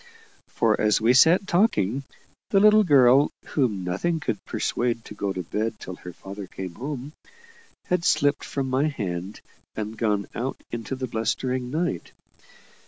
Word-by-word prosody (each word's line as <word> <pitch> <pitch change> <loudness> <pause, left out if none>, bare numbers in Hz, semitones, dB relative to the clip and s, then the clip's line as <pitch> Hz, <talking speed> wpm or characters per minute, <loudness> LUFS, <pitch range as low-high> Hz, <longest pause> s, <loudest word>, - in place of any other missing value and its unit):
For - - +1
as 105 -1 +3
we 115 +3 +4
sat 170 +9 +6
talking, 140 - +1 0.4
the 195 - +4
little 215 +1 +6
girl 140 -4 +5 0.2
whom 110 -10 0
nothing 100 - -1
could 105 -9 -3
persuade 120 -1 -1
to - - -9
go 100 -1 -2
to 95 -1 -4
bed 110 +5 -3
till 90 0 -8
her 90 - -9
father 95 +2 -9
came 90 -1 -7
home 140 - -6 0.7
had 180 -1 0
slipped 145 -3 +2
from 135 -1 -3
my 130 +3 +1
hand, 100 - -4 0.3
and 110 0 -4
gone 105 -3 0
out 130 +3 -3
into 120 +3 -4
the 130 0 -3
blustering 125 +2 -2
night. 155 - -2
125 Hz, 155 wpm, -25 LUFS, 105-145 Hz, 0.7 s, sat